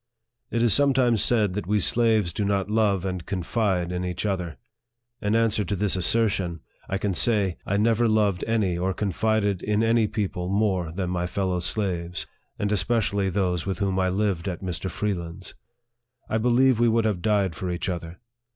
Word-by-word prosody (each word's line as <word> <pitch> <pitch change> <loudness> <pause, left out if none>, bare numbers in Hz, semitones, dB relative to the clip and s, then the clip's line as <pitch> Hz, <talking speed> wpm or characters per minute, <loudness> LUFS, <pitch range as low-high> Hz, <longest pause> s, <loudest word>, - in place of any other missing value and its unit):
It 115 0 0
is 115 - +4
sometimes 130 -5 +3
said 105 -6 +2
that 105 -1 -4
we 105 +1 +2
slaves 110 -4 +2
do 105 - -2
not 100 0 -1
love 105 -4 +1
and 90 -2 -3
con 95 -1 -4
fide 95 -4 0
in 90 0 -3
each 90 +2 -3
other. 90 -7 -2 0.6
In 105 +2 0
answer 115 -2 +2
to 100 +2 -2
this 100 0 +1
assertion, 95 -4 +1 0.3
I 95 - 0
can 100 -1 -1
say, 100 -3 +2
I 100 - +1
never 115 +2 +2
loved 105 -4 +1
any 100 -6 0
or 95 +1 -1
confided 105 -1 0
in 105 +1 0
any 115 -1 +3
people 100 -4 -3
more 95 -4 0
than 90 +1 -3
my 90 -1 -1
fellow 95 -1 -1
slaves, 90 -2 -2 0.3
and 100 0 -1
especially 100 -2 +1
those 90 -2 -1
with 95 - -2
whom 95 -2 0
I 95 0 +2
lived 95 -2 -1
at 90 0 -4
Mr. 90 0 -3
Freeland's. 90 -3 -4 0.7
I 110 - 0
believe 125 +1 +3
we 120 0 +4
would 115 0 +2
have 100 -5 0
died 100 -4 +1
for 95 0 -4
each 85 +2 -3
other. 85 -1 -5
100 Hz, 185 wpm, -25 LUFS, 90-110 Hz, 0.7 s, is